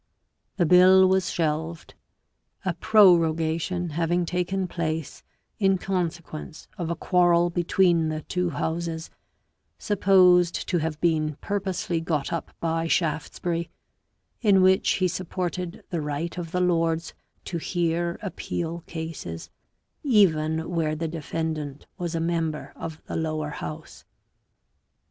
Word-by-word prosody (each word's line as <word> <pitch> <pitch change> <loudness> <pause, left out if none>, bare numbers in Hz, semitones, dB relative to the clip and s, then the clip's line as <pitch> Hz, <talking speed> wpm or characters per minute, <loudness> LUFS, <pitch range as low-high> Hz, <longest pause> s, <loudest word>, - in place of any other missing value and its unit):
The 175 - +3
bill 185 +2 +7
was 190 -1 +2
shelved, 160 0 -2 0.7
a - - +1
prorogation 170 -2 +3
having 170 +2 0
taken 180 +2 -1
place 160 -3 -3 0.4
in 195 -2 +3
con 180 -2 0
sequence 160 -1 -10
of 170 -3 -4
a 170 - -1
quarrel 175 0 +3
between 175 -1 +2
the 155 -1 -4
two 180 -1 -1
Houses, 165 0 -3 0.7
supposed 180 -3 +4
to 175 - +2
have 155 -1 -3
been 155 -3 +1
purposely 185 -3 -2
got 155 -3 -2
up 165 - -4
by 165 0 -1
Shaftesbury, 165 +1 -1 0.7
in 200 -5 +5
which 190 0 +4
he 185 - +1
supported 180 +1 -4
the 170 -3 -1
right 150 +3 -3
of 175 -2 -5
the 180 - 0
Lords 165 -2 +1 0.3
to 170 - -3
hear 170 0 -1
appeal 170 -3 -4
cases, 160 - -6 0.5
even 160 - +3
where 160 -3 0
the 165 +1 -3
defendant 155 -2 -4
was 175 -1 -3
a - - 0
member 165 -2 -2
of 160 -1 -7
the - - -6
Lower 155 -2 -2
House. 155 +1 -8
170 Hz, 125 wpm, -25 LUFS, 160-180 Hz, 0.7 s, bill